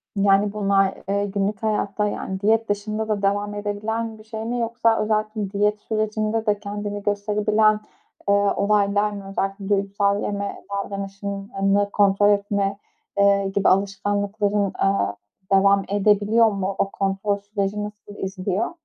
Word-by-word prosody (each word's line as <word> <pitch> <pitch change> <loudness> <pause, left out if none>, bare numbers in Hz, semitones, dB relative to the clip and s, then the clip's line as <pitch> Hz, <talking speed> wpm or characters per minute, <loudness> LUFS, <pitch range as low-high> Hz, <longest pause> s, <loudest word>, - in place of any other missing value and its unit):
Yani, 200 +1 +3
bunlar, 195 -2 +2 0.2
eee, 200 0 +1
günlük 200 +1 -2
hayatta, 210 -1 0
yani, 190 -2 -4
diyet 225 +2 +2
dışında 215 +2 -2
da 210 -2 -1
devam 205 +1 0
edebilen 220 +2 -3
bir - - -13
şey 220 0 -6
mi 240 +1 -2
yoksa 230 -1 +1
özellikle 215 -1 -1
diyet 210 +1 +1
sürecinde 215 0 -1
de 210 -2 +1
kendini 205 0 -5
gösterebilen, 210 +1 +2 0.5
eee, 200 - +5
olaylar 205 0 +2
mı? 200 -1 -7
Özellikle 195 0 -3
duygusal 200 0 +1
yeme 200 0 -4
davranışını 200 0 -2
kontrol 205 0 +4
etme, 200 -1 +1 0.4
eee, 200 0 +4
gibi 200 - +4
alışkanlıkların, 200 +1 0
eee, 195 - +1 0.4
devam 195 0 +5
edebiliyor 210 +3 +4
mu? 195 -1 -2
O 195 - +1
kontrol 195 +1 -1
süreci 205 0 -3
nasıl 210 0 -9
izliyor? 190 - -2
205 Hz, 135 wpm, -23 LUFS, 200-210 Hz, 0.5 s, eee